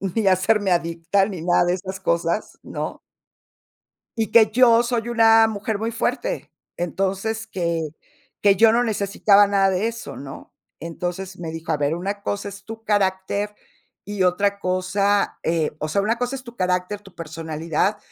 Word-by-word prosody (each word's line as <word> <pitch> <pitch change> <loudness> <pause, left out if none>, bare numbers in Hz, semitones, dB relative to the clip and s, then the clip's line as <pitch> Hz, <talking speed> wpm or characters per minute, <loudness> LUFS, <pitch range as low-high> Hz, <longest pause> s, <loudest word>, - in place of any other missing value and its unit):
ni 225 -2 +1
hacerme 190 +2 +3
adicta, 170 +3 +1
ni 190 -6 -6
nada 175 0 +3
de 175 - +1
esas 190 0 -7
cosas, 170 +1 -1
¿no? - - -5 1.2
y 220 -1 -1
que 220 -2 +6
yo 235 0 +5
soy 235 -1 -2
una 225 -1 +6
mujer 215 0 -3
muy 225 +2 -2
fuerte. 250 - -2 0.3
Entonces, 195 +6 -2
que 170 -6 -2 0.5
que 200 -1 +6
yo 225 +3 +6
no 235 +2 +3
necesitaba 205 -2 +3
nada 200 -1 +3
de 190 +2 0
eso, 230 0 -6
¿no? 135 0 -10 0.3
Entonces, 180 +3 -5
me 165 -2 -5
dijo: 165 +1 -5
"A - - +1
ver, 145 +1 0
una 200 +4 -4
cosa 200 0 -3
es 200 0 -12
tu 225 0 -9
carácter 200 0 0 0.5
y 205 -2 -2
otra 200 +3 +1
cosa, 195 +2 0
eh, 165 -2 0
o 155 - -2
sea, 175 +6 +1
una 220 +4 0
cosa 245 +2 -2
es 265 - -8
tu 240 -2 -12
carácter, 180 +1 -1
tu 195 -3 -16
personalidad, 165 +3 -2
195 Hz, 165 wpm, -22 LUFS, 175-220 Hz, 1.2 s, que